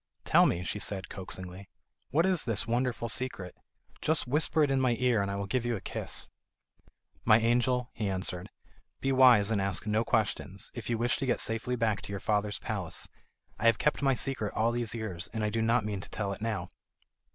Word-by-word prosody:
"Tell - - +6
me," 85 - -1
she 105 - -3
said, 95 -2 -3
coaxingly, 95 0 -7 0.4
"what 160 +6 +3
is 185 -7 +1
this 115 -4 0
wonderful 120 0 -1
secret? 115 -7 -2 0.5
Just 160 0 +1
whisper 150 +4 +2
it 145 - +2
in 135 -1 +2
my 125 -2 +2
ear, 125 -4 +2
and 100 - -1
I 100 - -2
will 100 0 -3
give 120 +5 -1
you 120 -1 0
a - - -4
kiss." - - -3 1.0
"My 110 -1 +6
angel," 125 +2 +1
he 105 -3 -2
answered, 95 -1 -1 0.5
"be 135 - 0
wise, 125 -6 +6
and 105 -3 +1
ask 95 0 0
no 105 +1 +1
questions, 105 -4 -1
if 120 -2 -6
you 115 - +1
wish 120 +2 +1
to 135 - -3
get 120 - +1
safely 115 +3 0
back 110 -4 0
to - - -7
your 100 - -3
father's 105 +1 0
palace; - - -4 0.5
I 115 - +2
have 115 -2 +5
kept 150 +6 +1
my 135 -2 +3
secret 120 -5 -2
all 115 +2 +2
these 120 -1 -2
years, 95 -6 -5
and 105 -2 -1
do 115 - +1
not 115 0 +2
mean 100 -3 -3
to - - -9
tell 100 -2 -3
it 100 - -10
now." 105 -5 -3
115 Hz, 210 wpm, -30 LUFS, 100-125 Hz, 1.0 s, Tell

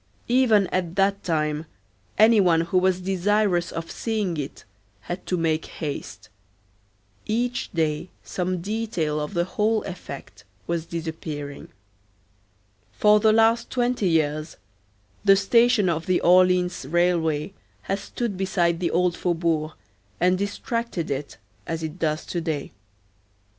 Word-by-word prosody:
Even 235 -5 +4
at 180 -2 -2
that 200 0 +1
time 155 -1 -1 0.5
any 220 0 +6
one 170 -3 +4
who 170 +2 +1
was 185 0 +2
desirous 190 -1 +1
of 165 0 -5
seeing 215 -6 -2
it 145 -2 -6 0.4
had 175 +11 -6
to 180 - 0
make 160 -1 0
haste. 105 - -6 1.0
Each 240 +3 -1
day 160 +1 -1
some 180 -1 -2
detail 195 -7 -2
of 150 +5 -4
the 170 - +2
whole 215 +4 0
effect 135 - -9 0.2
was 170 -1 -2
disappearing. 160 -4 -6 1.2
For 210 0 +4
the 220 0 +4
last 225 +1 +3
twenty 245 -6 0
years 155 -1 0 0.7
the 195 -1 +7
station 230 +1 +4
of 165 -1 -1
the 185 -1 +3
Orleans 180 -1 +4
railway 170 0 +1 0.3
has 195 +1 -2
stood 230 0 -4
beside 175 -3 +1
the 175 - 0
old 180 0 +1
faubourg 165 -3 0 0.5
and 180 +1 +3
distracted 200 - -3
it, 140 +1 -4 0.3
as 165 0 -3
it 160 +3 -5
does 155 -1 -1
to 175 - -3
day. 155 -4 -3
180 Hz, 130 wpm, -24 LUFS, 160-200 Hz, 1.2 s, the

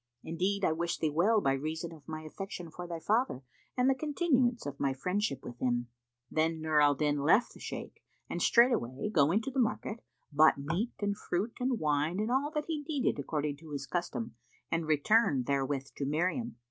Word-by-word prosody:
Indeed 190 +5 0
I - - +3
wish 170 +2 -1
thee 155 - 0
well 205 +8 +3
by 135 - +2
reason 160 +4 -3
of 150 -4 -15
my 155 -1 -5
affection 175 +1 -7
for 175 +2 -7
thy 170 -1 -5
father 215 - 0 0.3
and 250 +1 +3
the 270 - +5
continuance 265 -4 +1
of 140 -1 -5
my 135 -1 +1
friendship 180 - -1
with 120 0 -9
him." 120 -1 0 0.4
Then 160 +1 +1
Nur 155 -1 +2
al 145 -1 +5
Din 145 0 +1
left 170 +11 +3
the - - -14
Shaykh - - -7 0.3
and - - -4
straightway 215 - +3
going 165 +8 +4
to 270 - -4
the 265 - -1
market, 230 -1 0 0.3
bought 155 +1 +5
meat 165 - -2
and 205 0 0
fruit 205 +3 -2
and 250 -1 +1
wine 150 +4 +1
and 215 +3 0
all 270 +3 +2
that 300 0 0
he 315 -3 -2
needed 285 - 0
according 145 0 -2
to 160 +1 -13
his 140 -1 -4
custom 175 - -3 0.4
and 165 -1 0
returned 155 - +3
therewith 135 0 -1
to 140 - -2
Miriam. 180 - -1
165 Hz, 195 wpm, -31 LUFS, 145-225 Hz, 0.4 s, the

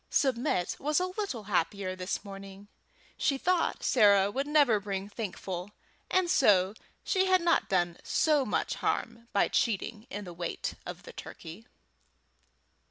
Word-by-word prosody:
Submit 250 - +1
was 300 +3 +1
a 365 - +1
little 370 - -4
happier 190 -1 -1
this 185 +3 -4
morning. 195 0 -10 0.5
She 275 - +1
thought 360 +4 0
Sarah 200 -4 +5
would 275 +6 -2
never 290 -8 +4
bring 200 -1 -4
Thankful, 200 -2 -5 0.4
and 370 -1 +2
so 205 - +4 0.3
she 380 -1 +2
had 370 0 +5
not 340 -1 +2
done 175 -2 +1
so 300 -3 +2
much - - -1
harm 230 0 -2
by 200 - +3
cheating 220 +1 -1
in 205 - -5
the 175 - -8
weight 170 0 -4
of - - -7
the - - -11
turkey. 180 +9 -10
210 Hz, 145 wpm, -30 LUFS, 195-290 Hz, 0.5 s, Sarah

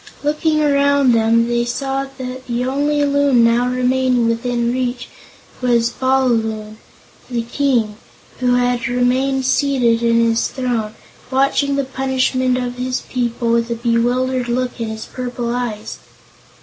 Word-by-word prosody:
Looking 305 +1 +1
around 280 -2 +3
them, 230 0 +3
they 240 0 +1
saw 270 +3 -2
that 255 0 -7
the 240 0 -1
only 290 +2 +1
Loon 280 -4 +3
now 235 +1 +3
remaining 250 -1 +1
within 235 +1 -1
reach 250 -1 -3 0.5
was 240 -1 +2
Bal 260 +1 +1
Loon, 220 -2 -2 0.5
the 235 -2 -2
King, 235 -4 0 0.4
who 250 -1 +2
had 245 -1 0
remained 255 +2 +1
seated 255 -4 +2
in 230 0 +3
his 230 0 +1
throne, 235 -4 -3 0.3
watching 275 +1 +1
the 280 - 0
punishment 260 -1 0
of 250 -1 -4
his 255 +1 -2
people 240 -1 -2
with 235 0 +1
a 235 - -1
bewildered 245 +2 0
look 245 0 -2
in 225 - -2
his 220 0 -6
purple 245 -1 -4
eyes. 225 -4 -4
250 Hz, 140 wpm, -18 LUFS, 235-260 Hz, 0.5 s, around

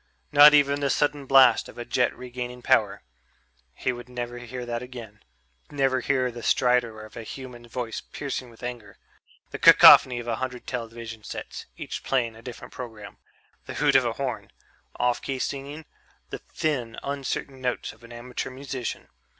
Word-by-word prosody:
Not 150 0 +9
even 140 -1 +3
the 140 -1 0
sudden 145 -1 0
blast 130 -4 +6
of - - -14
a 120 - -6
jet 120 0 +1
regaining 125 0 -7
power... - - +2 0.7
he 130 - -1
would 120 0 -9
never 120 -1 -5
hear 125 +1 -7
that 120 0 -3
again; 120 -4 -10 0.5
never 135 -2 +1
hear 130 -1 0
the 120 0 -9
stridor 120 -2 +1
of 110 - -15
a 115 - -6
human 120 +1 -9
voice 120 -1 -4
piercing 135 -3 -5
with 115 +1 -17
anger; 120 -5 -7 0.5
the - - -6
cacophony 125 -2 +9
of 120 0 -6
a 115 -2 -1
hundred 125 -1 -5
television 115 -2 -6
sets, - - -7
each - - -6
playing 120 -4 0
a 110 - -13
different 120 0 -10
program; 110 -5 -9 0.5
the - - -6
hoot - - +2
of - - +6
a - - -1
horn; - - -4 0.5
off 125 0 0
key 135 -1 -3
singing; 140 +4 -5 0.5
the - - -5
thin, 125 -7 -3
uncertain 140 -1 -4
notes 125 -1 -2
of - - -22
an 115 - -13
amateur 120 +1 -5
musician 130 -2 -6
125 Hz, 170 wpm, -25 LUFS, 120-135 Hz, 0.7 s, Not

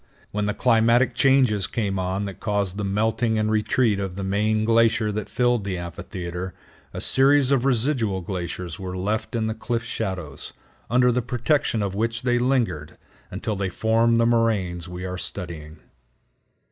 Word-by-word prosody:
When 105 0 -1
the 105 - -1
climatic 120 +1 +3
changes 125 -7 +3
came 100 -4 -2
on 95 +2 -2
that 100 -2 -7
caused 100 -3 -1
the 105 - -2
melting 110 +3 0
and 110 0 +1
retreat 110 0 +2
of 95 -2 -4
the 100 - -4
main 105 +3 +1
glacier 115 -1 +3
that 105 -1 -4
filled 120 -2 +1
the 95 -2 -3
amphitheater, 90 +1 -6 0.4
a - - -6
series 140 0 +4
of 135 -2 +2
residual 120 -6 +1
glaciers 90 -2 -5
were 95 -1 -5
left 110 +5 -2
in 110 -1 0
the 110 - -1
cliff 115 +1 -3
shadows, 95 -10 -5 0.4
under 125 +1 +4
the 125 +1 +1
protection 120 -1 0
of 100 -2 -2
which 115 +3 -2
they 120 -1 +2
lingered, 120 - 0 0.3
until 110 - -3
they 95 -1 -2
formed 115 +4 +2
the 115 - +4
moraines 105 -7 +1
we 90 +1 -6
are 90 0 -4
studying. 80 -5 -7
110 Hz, 165 wpm, -24 LUFS, 95-115 Hz, 0.4 s, series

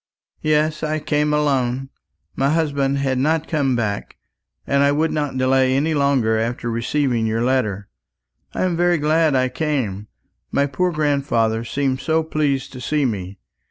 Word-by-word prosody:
"Yes, 155 0 +1
I 155 0 -1
came 150 0 0
alone. 135 -3 0 0.5
My 135 +1 +1
husband 140 -3 +1
had 135 -2 0
not 160 +3 +1
come 140 -5 +1
back, 105 -4 -3 0.5
and 140 0 +2
I 140 0 +4
would 155 +2 +1
not 145 -3 -2
delay 130 0 +3
any 155 +4 +1
longer 135 -6 +2
after 120 +1 -2
receiving 120 0 0
your 115 +1 0
letter. 110 -6 0 0.7
I - - 0
am 180 -2 0
very 175 0 +2
glad 155 0 +2
I 130 0 +2
came. 125 -7 -2 0.4
My 140 - +2
poor 175 +6 0
grandfather 140 -7 0
seemed 130 +2 -1
so 160 +3 +1
pleased 145 -4 -1
to 130 - -8
see 150 +3 0
me. 95 -5 -3
140 Hz, 160 wpm, -21 LUFS, 125-150 Hz, 0.7 s, I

